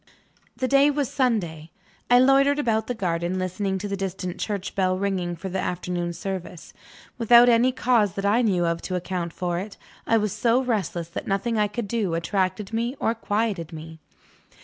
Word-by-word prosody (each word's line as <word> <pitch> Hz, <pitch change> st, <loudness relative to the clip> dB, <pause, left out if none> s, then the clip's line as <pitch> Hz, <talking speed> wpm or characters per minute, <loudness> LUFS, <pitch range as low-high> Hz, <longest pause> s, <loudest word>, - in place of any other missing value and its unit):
The 255 Hz, -, 0 dB
day 275 Hz, +2 st, +5 dB
was 285 Hz, -3 st, -1 dB
Sunday. 175 Hz, -, -1 dB, 0.4 s
I 245 Hz, -, +7 dB
loitered 275 Hz, +2 st, +5 dB
about 220 Hz, -6 st, 0 dB
the 245 Hz, -, -2 dB
garden, 175 Hz, -2 st, -1 dB
listening 190 Hz, +1 st, -2 dB
to 205 Hz, +2 st, -4 dB
the 200 Hz, -, -2 dB
distant 190 Hz, -2 st, -4 dB
church 200 Hz, -3 st, -3 dB
bell 185 Hz, -1 st, +1 dB
ringing 185 Hz, -3 st, -1 dB
for 175 Hz, +3 st, -7 dB
the 190 Hz, 0 st, -3 dB
afternoon 175 Hz, -1 st, -2 dB
service. 185 Hz, -2 st, -6 dB, 0.5 s
Without 235 Hz, +1 st, +7 dB
any 240 Hz, +2 st, +4 dB
cause 240 Hz, -6 st, +2 dB
that 195 Hz, -, -3 dB
I 215 Hz, +4 st, +3 dB
knew 185 Hz, -7 st, +2 dB
of 170 Hz, 0 st, -1 dB
to 185 Hz, -, -4 dB
account 180 Hz, -1 st, -3 dB
for 175 Hz, 0 st, -2 dB
it, 200 Hz, +2 st, -7 dB, 0.3 s
I 225 Hz, -, +4 dB
was 210 Hz, -3 st, -1 dB
so 235 Hz, +1 st, +2 dB
restless 190 Hz, -8 st, -2 dB
that -, -, -6 dB
nothing 215 Hz, +3 st, 0 dB
I 210 Hz, -, +3 dB
could 205 Hz, +1 st, -4 dB
do 200 Hz, -6 st, -1 dB
attracted 190 Hz, +4 st, -1 dB
me 235 Hz, +3 st, -1 dB
or 225 Hz, -, +1 dB
quieted 210 Hz, -6 st, -2 dB
me. 160 Hz, 0 st, -9 dB
200 Hz, 185 wpm, -24 LUFS, 180-230 Hz, 0.5 s, I